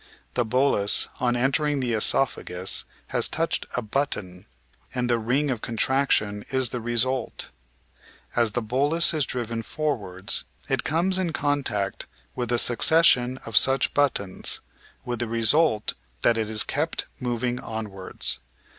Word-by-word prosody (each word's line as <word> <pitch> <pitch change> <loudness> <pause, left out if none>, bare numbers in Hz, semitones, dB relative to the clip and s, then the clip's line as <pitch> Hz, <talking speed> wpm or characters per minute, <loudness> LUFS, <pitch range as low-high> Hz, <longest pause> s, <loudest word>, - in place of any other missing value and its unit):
The 125 - +1
bolus, 125 -4 +3
on 125 -2 +1
enter 135 +6 +1
ing 145 -1 0
the 125 -3 -1
oesophagus, 100 -5 +2 0.2
has - - +2
touched - - -1
a 125 - -1
'button,' 105 -7 -3 0.5
and 125 -1 0
the 120 -1 +1
ring 130 +6 0
of 120 -4 -3
con 115 - -6
traction 110 -5 +1
is 130 -2 +2
the 125 -1 -5
result. 120 +2 -1 0.9
As 115 -3 +2
the 120 - -1
bolus 145 +10 +2
is 150 -4 0
driven 115 -2 -3
forwards 105 - -2 0.2
it - - 0
comes 180 +4 0
in 175 -3 -1
contact 140 -11 -2 0.3
with 120 -2 -3
a 120 - +2
succession 125 0 +4
of 115 - -7
such 135 +7 +4
buttons, 115 -10 0 0.5
with 120 -2 -3
the 120 - -1
result 115 +1 +2 0.3
that 120 - +4
it 110 -1 -2
is 110 -1 +4
kept 155 +3 -2
moving 125 -1 -2
onwards. 105 -4 -3
120 Hz, 145 wpm, -25 LUFS, 110-140 Hz, 0.9 s, succession